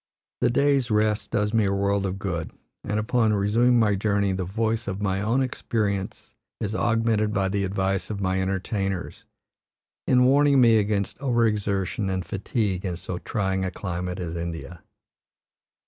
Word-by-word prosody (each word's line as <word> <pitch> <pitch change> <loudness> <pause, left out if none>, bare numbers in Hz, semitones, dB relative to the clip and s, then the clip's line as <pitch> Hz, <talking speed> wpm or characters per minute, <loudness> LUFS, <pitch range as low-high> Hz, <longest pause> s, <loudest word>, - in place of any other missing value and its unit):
The - - +3
day's 135 0 +2
rest 105 -1 +1
does 105 +1 0
me 110 -2 +3
a 100 - +1
world 100 0 +1
of 95 +1 -4
good, 85 -5 -3 0.3
and 105 +1 -1
upon 110 0 +2
resuming 115 +5 +3
my 110 -3 +3
journey 100 0 +1
the 95 0 -2
voice 110 +4 -1
of 100 0 -3
my 95 -1 -1
own 115 +6 +1
experience 105 -6 -3 0.3
is 105 0 -3
augmented 115 -2 +1
by 95 -1 +1
the 100 0 -1
advice 95 0 -1
of 105 -2 -4
my 95 -1 0
entertainers, 95 0 -3 0.8
in 125 -1 +5
warning 140 +1 +5
me 115 -3 +6
against 100 0 -1
overexertion 105 -6 0
and 95 -1 -2
fatigue 100 -2 -2
in 90 -3 -3
so 90 0 -5
trying 95 -3 -1
a 95 - -1
climate 90 -1 -4
as 85 -2 -4
India. 85 0 -6
100 Hz, 160 wpm, -25 LUFS, 95-110 Hz, 0.8 s, me